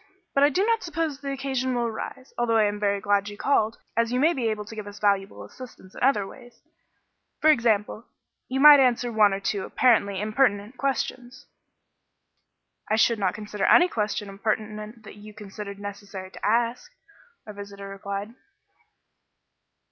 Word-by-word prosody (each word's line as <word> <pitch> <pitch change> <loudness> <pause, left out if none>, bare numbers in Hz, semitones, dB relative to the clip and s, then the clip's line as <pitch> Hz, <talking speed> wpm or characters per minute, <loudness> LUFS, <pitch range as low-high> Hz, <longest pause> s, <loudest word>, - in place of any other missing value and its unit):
But 275 - +3
I 290 - +6
do 370 +8 +1
not 455 0 +1
suppose 325 -4 -3
the 280 -1 -4
occasion 265 -2 -2
will 240 -1 0
arise, 235 +3 -6
although 235 -1 +1
I 220 - +4
am 205 0 -1
very 200 -1 0
glad 205 0 +1
you 205 - -10
called, 225 -4 +1 0.2
as 230 0 +1
you 250 - 0
may 320 +5 +4
be 250 -6 -2
able 215 -1 -2
to 215 - -10
give 215 -2 -7
us 205 0 -9
valuable 200 -1 0
assistance 240 -7 -13
in - - -11
other 245 -6 +3
ways. 245 +3 -14 0.8
For 310 - +6
example, 225 -3 0 0.4
you 265 +1 -2
might 295 0 +9
answer 245 -2 +2
one 215 -2 +4
or 195 - -2
two 200 0 -2
apparently 200 -6 +2
impertinent 215 0 0
questions." 260 -2 -3 1.4
"I 215 - +3
should 225 0 +3
not 195 -1 0
consider 210 -1 -4
any 355 - +6
question 210 - -2
impertinent 215 +2 -4
that - - -12
you 210 0 -13
considered 205 -1 -8
necessary 200 -2 -8
to - - -13
ask," 235 +3 0 0.5
our 210 - -9
visitor 200 -1 -9
replied. 200 +2 -6
215 Hz, 170 wpm, -25 LUFS, 205-255 Hz, 1.4 s, might